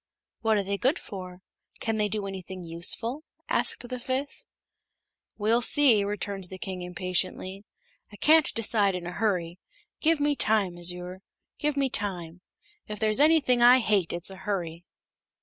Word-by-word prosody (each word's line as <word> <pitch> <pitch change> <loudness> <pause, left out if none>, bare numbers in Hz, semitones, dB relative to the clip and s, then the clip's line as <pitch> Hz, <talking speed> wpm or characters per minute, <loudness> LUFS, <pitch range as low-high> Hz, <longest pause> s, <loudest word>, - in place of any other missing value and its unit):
"What 220 -1 +2
are 200 - 0
they 200 +1 -3
good 265 +5 +2
for? 185 -2 -9 0.4
Can 225 -1 -1
they 210 -1 +1
do 210 0 -3
anything 190 -1 -7
useful?" 225 - -1 0.2
asked 245 - 0
the 250 0 -5
fifth. 260 +3 -4 0.9
"We'll 225 +3 +2
see," 250 -5 +5
returned 200 -1 -4
the 185 +1 -9
King, 185 -1 -6
impatiently. 185 +2 -3 0.5
"I - - -11
can't 310 +7 +4
decide 210 -4 +2
in 180 -1 -5
a 175 - -4
hurry. 180 -4 -1 0.4
Give 325 0 +2
me 290 0 +1
time, 210 -8 +1
Azure; 180 +1 -3 0.4
give 300 -2 -1
me 275 -1 +2
time. 180 -4 -3 0.5
If 210 - -5
there's 215 +2 +1
anything 290 -5 +4
I 245 +2 +8
hate 210 -8 +1
it's 175 +2 +2
a 190 - -10
hurry." 175 -4 -4
205 Hz, 155 wpm, -27 LUFS, 180-240 Hz, 0.9 s, I